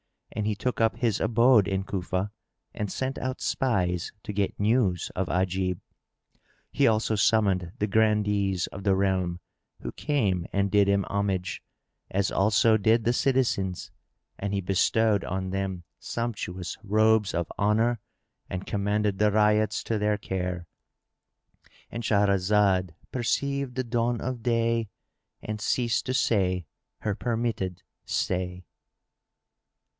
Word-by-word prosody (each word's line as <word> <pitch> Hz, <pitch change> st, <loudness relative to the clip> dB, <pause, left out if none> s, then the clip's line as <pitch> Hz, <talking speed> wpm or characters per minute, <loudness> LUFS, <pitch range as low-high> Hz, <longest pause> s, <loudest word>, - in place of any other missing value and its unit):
And 105 Hz, 0 st, -2 dB
he 105 Hz, -, 0 dB
took 125 Hz, +3 st, -2 dB
up 110 Hz, 0 st, +3 dB
his 115 Hz, -5 st, 0 dB
abode 115 Hz, -1 st, +4 dB
in 95 Hz, -1 st, -1 dB
Cufa 95 Hz, +1 st, -2 dB, 0.4 s
and 105 Hz, -2 st, -3 dB
sent 130 Hz, +1 st, -3 dB
out 130 Hz, 0 st, -3 dB
spies 90 Hz, -9 st, 0 dB
to 105 Hz, -, -5 dB
get 100 Hz, -1 st, -1 dB
news 105 Hz, -5 st, +1 dB
of 95 Hz, 0 st, -1 dB
Ajib. 90 Hz, 0 st, 0 dB, 0.9 s
He 140 Hz, -, +3 dB
also 110 Hz, 0 st, +2 dB
summoned 100 Hz, -5 st, +2 dB
the 105 Hz, -, 0 dB
Grandees 105 Hz, -3 st, +2 dB
of 100 Hz, -, -9 dB
the 95 Hz, -1 st, +3 dB
realm, 95 Hz, -2 st, 0 dB, 0.4 s
who -, -, -5 dB
came 100 Hz, -, 0 dB
and 100 Hz, -1 st, +1 dB
did 100 Hz, -1 st, +4 dB
him 100 Hz, 0 st, +3 dB
homage; 95 Hz, -3 st, -1 dB, 0.5 s
as 100 Hz, +1 st, 0 dB
also 110 Hz, +2 st, +4 dB
did 110 Hz, +2 st, +3 dB
the 120 Hz, -, +2 dB
citizens 120 Hz, -9 st, 0 dB, 0.5 s
and 100 Hz, 0 st, -3 dB
he 100 Hz, -, 0 dB
bestowed 100 Hz, +3 st, +2 dB
on 95 Hz, 0 st, -3 dB
them 95 Hz, -2 st, -3 dB, 0.2 s
sumptuous 100 Hz, -6 st, -4 dB
robes 110 Hz, 0 st, +3 dB
of 85 Hz, -1 st, -2 dB
honour 110 Hz, +3 st, +2 dB, 0.5 s
and 95 Hz, 0 st, -4 dB
commended 105 Hz, 0 st, 0 dB
the 105 Hz, 0 st, +4 dB
Ryots 105 Hz, 0 st, +2 dB
to 110 Hz, -2 st, -1 dB
their 105 Hz, 0 st, +1 dB
care.——And 90 Hz, +4 st, -8 dB
Shahrazad 100 Hz, -2 st, +2 dB, 0.2 s
perceived 140 Hz, +1 st, -1 dB
the 130 Hz, -, 0 dB
dawn 120 Hz, 0 st, 0 dB
of 125 Hz, -2 st, -4 dB
day 115 Hz, -1 st, +1 dB, 0.5 s
and 105 Hz, 0 st, -4 dB
ceased 120 Hz, 0 st, 0 dB
to 130 Hz, -, 0 dB
say 95 Hz, -7 st, +1 dB, 0.3 s
her 105 Hz, -, -1 dB
permitted 110 Hz, -5 st, -2 dB, 0.2 s
say. 90 Hz, 0 st, -2 dB
105 Hz, 130 wpm, -27 LUFS, 95-115 Hz, 0.9 s, abode